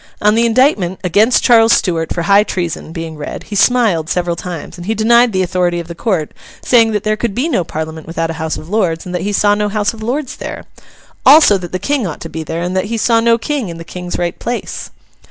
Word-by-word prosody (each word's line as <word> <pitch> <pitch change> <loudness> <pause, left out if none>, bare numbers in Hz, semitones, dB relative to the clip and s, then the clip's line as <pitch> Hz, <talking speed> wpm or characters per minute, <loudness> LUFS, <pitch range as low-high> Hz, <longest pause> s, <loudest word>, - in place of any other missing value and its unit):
On 210 0 +3
the 230 +1 +3
indictment 225 - +2
'against 210 +7 +3
Charles 230 -1 +5
Stuart, 165 -3 0
for 170 - -2
high 200 +4 +5
treason,' 175 -5 -4
being 165 -1 -6
read, 150 - -6
he 210 - -7
smiled 200 -8 +2
several 175 -1 -1
times, 175 -2 -7
and 175 +1 -9
he 220 - 0
denied 235 +2 +4
the 185 -2 0
authority 175 -1 0
of 170 - -7
the 170 - -7
Court, 170 -5 -2 0.3
saying 230 -3 +4
that 210 -1 -1
there 215 -1 +1
could 215 -2 -3
be 260 +6 0
no 195 - 0
parliament 160 0 -6
without 165 0 -2
a 160 0 -7
House 160 -1 -2
of 155 - -9
Lords, 180 -5 -1
and 180 - -7
that 180 - -2
he 205 - -2
saw 205 0 +3
no 210 0 0
House 210 +1 -1
of 220 - -11
Lords 255 +5 -3
there. - - -7 0.6
Also, 285 -6 +7
that 180 -3 -5
the 185 - -1
King 250 +3 -1
ought 160 - -6
to 165 - -7
be 160 0 -5
there, 160 +2 -4
and 180 +1 -3
that 185 +1 0
he 230 +2 -3
saw 230 +1 +3
no 230 0 +3
King 260 -3 -3
in 165 - -7
the 165 - -8
King's 180 +1 -6
right 175 +1 -3
place. 240 0 -4
190 Hz, 245 wpm, -15 LUFS, 170-225 Hz, 0.6 s, Also